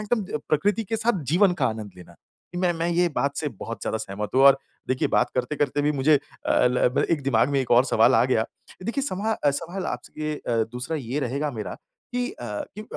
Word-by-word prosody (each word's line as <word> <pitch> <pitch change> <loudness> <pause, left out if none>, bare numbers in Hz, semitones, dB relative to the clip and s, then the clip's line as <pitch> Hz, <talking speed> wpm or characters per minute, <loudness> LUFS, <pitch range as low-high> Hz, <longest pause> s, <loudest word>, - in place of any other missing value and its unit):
एकदम 205 -10 0
प्रकृति 205 +8 +1
के 225 +4 -2
साथ 220 -7 0
जीवन 185 +1 +5
का - - +5
आनंद 110 -2 -5
लेना, 90 - -13 0.4
कि 175 - -4
मैं 180 -1 +2
मैं 165 +1 -2
ये 175 +1 +2
बात 140 +3 0
से 150 - -1
बहुत 115 0 -7
ज़्यादा 110 - -1
सहमत 105 +2 -5
हूँ, 135 - +5
और 135 0 +8 0.3
देखिए 130 0 +1
बात - - +2
करते-करते 145 +1 0
भी 150 +1 +2
मुझे 145 +2 +3
अ, 135 -2 0
ल 125 0 +3
ब - - +3
एक 150 -4 +1
दिमाग 130 -1 +3
में 140 - +2
एक 130 - -4
और 120 +2 +6
सवाल 120 +1 +4
आ - - +5
गया। 115 -4 +2 0.4
देखिए 235 +7 -2
सवा 215 -1 -1
सवाल 175 +6 -4
आपसे 155 0 -4
अ, 115 -5 -1
दूसरा 130 +6 -3
ये 135 +1 -3
रहेगा 140 +4 -1
मेरा 105 -7 -5 0.4
कि 245 0 -1
अ, - - -13 0.4
क्यों 215 +1 -7
145 Hz, 215 wpm, -25 LUFS, 125-175 Hz, 0.4 s, और